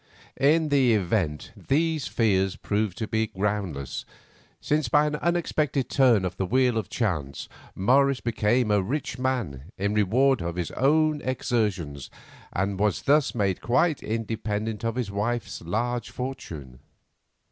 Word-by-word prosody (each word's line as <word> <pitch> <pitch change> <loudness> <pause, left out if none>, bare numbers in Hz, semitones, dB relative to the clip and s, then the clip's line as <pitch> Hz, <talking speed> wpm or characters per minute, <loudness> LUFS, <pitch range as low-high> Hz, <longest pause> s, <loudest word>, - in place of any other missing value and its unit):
In 155 +3 +3
the 130 -5 +4
event 90 -6 -1
these 155 0 0
fears 95 -4 +1
proved 105 -3 -2
to 110 - -3
be 110 0 0
groundless, 95 -9 -3 0.6
since 150 -4 0
by 150 +5 +4
an 150 0 -1
unexpected 155 -5 0
turn 120 -8 +4
of 90 0 -4
the 95 - 0
wheel 125 0 +2
of 105 - -6
chance 75 - -2 0.3
Morris 135 +6 +3
became 115 0 +1
a 105 -1 +4
rich 130 +7 -3
man 110 - -2
in 100 +2 0
reward 115 +5 +3
of 85 0 -3
his 90 -2 -3
own 155 +2 +2
exertions, 105 - -2 0.4
and 95 +1 -1
was 105 0 +1
thus 145 -1 +3
made 100 -5 0
quite 145 +6 +2
independent 110 -1 -3
of 115 0 -1
his 120 -6 -2
wife's 110 +3 -2
large 115 +7 -2
fortune. 80 - -7
110 Hz, 140 wpm, -26 LUFS, 95-130 Hz, 0.6 s, the